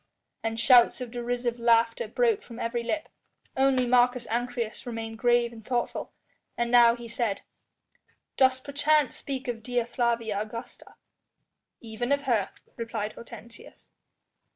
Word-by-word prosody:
And 225 0 -3
shouts 240 +1 +6
of 250 -2 -6
derisive 240 0 -2
laughter 230 - +2
broke 460 -4 +1
from 235 - -11
every 235 0 -2
lip. 305 +7 -3 0.5
Only 265 -1 +3
Marcus 245 0 +3
Ancyrus 240 -1 -3
remained 225 -1 -5
grave 240 0 +2
and 225 -1 -12
thoughtful, 240 +1 -2 0.5
and 235 0 -1
now 235 -1 +7
he 240 -1 -9
said: 230 -4 -2 0.9
"Dost 260 -1 +3
perchance 290 0 +1
speak 270 -1 -5
of 235 -2 -3
Dea 245 +1 -1
Flavia 230 -4 -1
Augusta?" 230 +3 -9 0.9
"Even 230 +3 -4
of 280 0 +2
her," 230 -8 +1 0.3
replied 230 -2 -4
Hortensius. 235 0 -12
240 Hz, 130 wpm, -27 LUFS, 230-250 Hz, 0.9 s, now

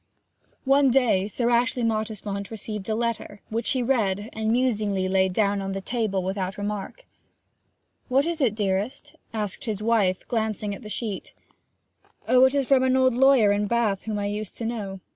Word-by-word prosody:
One 275 0 +5
day 235 -7 +3
Sir 235 +3 -1
Ashley 240 +1 +2
Mottisfont 215 -3 -2
received 210 -2 -6
a 215 - +1
letter, 230 -3 -3
which 225 +1 0
he 255 -2 0
read, 220 -4 0
and 220 0 -1
musingly 210 -6 +1
laid 190 0 +2
down 200 0 +1
on 195 0 -3
the 195 - -3
table 205 -3 -1
without 190 0 -3
remark. 205 - -5 1.0
'What 270 +3 +3
is 335 -2 -2
it, 230 -6 +2
dearest?' 210 +8 -2 0.2
asked 210 -4 -4
his 215 -2 -3
wife, 210 -5 +1
glancing 220 -3 -2
at 200 - -9
the 210 - -9
sheet. 215 -3 -4 0.9
'Oh, 255 +1 +6
it 260 +2 +2
is 275 -1 +1
from 265 0 +4
an 260 0 +3
old 260 -1 +4
lawyer 250 -5 +5
at 205 0 0
Bath 220 -4 0
whom 215 -1 -2
I 205 - -2
used 205 0 -4
to 230 - -4
know. 200 -5 -4
215 Hz, 180 wpm, -25 LUFS, 200-245 Hz, 1.0 s, Oh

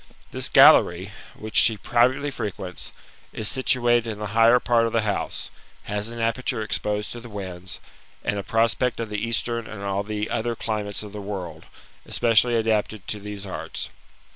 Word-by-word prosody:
This - - -2
gallery, 90 +4 +6 0.2
which 110 0 -9
she 110 -1 +6
privately 125 +7 +2
frequents, 95 - -5 0.4
is 110 - -2
situated 120 -2 +3
in 110 - -4
the 105 - -5
higher 115 +2 +6
part 115 -1 +2
of 115 - -5
the 115 -1 +2
house, 105 -2 -3 0.3
has 105 +1 -3
an 115 - -7
aperture 115 0 -1
exposed 105 0 -2
to 120 - -6
the 120 0 -11
winds, 95 -3 -6 0.4
and 105 - -1
a - - -4
prospect 115 +3 +1
of 115 -2 -4
the 105 -1 -2
eastern 115 0 -1
and 105 -2 -8
all 100 0 -1
the 105 +1 -3
other 115 +1 -1
climates 105 -2 -3
of 105 - -9
the 105 0 -7
world, 90 -5 -6 0.4
especiaily 120 +1 +3
adapted 110 -2 -1
to 105 - -1
these 100 0 -7
arts. 95 - -5
110 Hz, 170 wpm, -24 LUFS, 100-115 Hz, 0.4 s, gallery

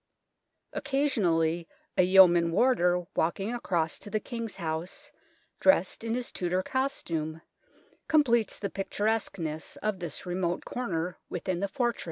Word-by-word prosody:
Occasionally 175 - +1 0.3
a - - +5
yeoman 180 -2 +6
warder 180 -5 +3
walking 195 +7 0
across 170 -9 0
to - - -9
the 215 +1 0
King's 230 -2 -5
House, 165 0 -4 0.5
dressed 255 -8 +3
in 230 0 -1
his 250 -1 -3
Tudor 180 +1 -1
costume, 165 - -2 0.6
completes 240 -8 +3
the 200 -2 -4
pictur 200 +1 -3
esqueness 165 -8 -2
of 210 -3 -2
this 170 -4 -4
remote 175 -1 -2
corner 180 -7 -3
within 180 0 -2
the 200 - 0
fortress. 235 +3 -1
185 Hz, 130 wpm, -29 LUFS, 170-230 Hz, 0.6 s, yeoman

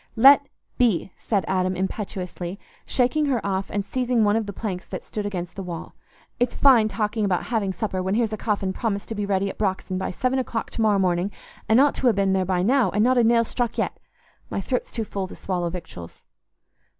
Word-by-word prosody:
"Let 275 +4 +7 0.3
be!" 215 -6 +2
said 200 -6 -1
Adam 185 0 +1
impetuously, 185 -1 -4 0.3
shaking 285 +4 +2
her 260 -4 +1
off 195 -1 -1
and 205 -1 -2
seizing 250 -2 +1
one 205 0 +3
of 225 -2 0
the - - -3
planks 190 -3 -5
that - - -6
stood 210 -1 -4
against 180 -3 -4
the 195 - -5
wall. 175 -3 -6 0.5
"It's 245 0 +1
fine 250 -6 +6
talking 210 +1 -1
about 190 -3 +1
having 205 -4 +1
supper 190 -1 -2
when 190 +2 0
here's 225 -2 +1
a - - +1
coffin 200 -3 -1
promised 200 -2 -2
to - - -2
be 205 -1 -2
ready 195 0 +1
at - - -6
Brox'on 190 -2 -1
by - - -2
seven 255 +7 0
o'clock 235 -3 -3
to - - -3
morrow 215 -2 +4
morning, 180 0 +1 0.4
and 220 +3 +6
ought 285 +1 +5
to 250 - +3
ha' - - -4
been 195 -1 +2
there 190 -1 +1 0.2
now, 255 +4 +3
and 210 +1 +1
not 255 +1 +4
a - - +5
nail 230 0 +4
struck 240 +1 -2
yet. - - -1 0.5
My - - -2
throat's 250 +6 -2
too 230 - -2
full 195 -2 -4
to - - -10
swallow 175 -2 -2
victuals." 165 - -9
205 Hz, 215 wpm, -24 LUFS, 190-235 Hz, 0.5 s, Let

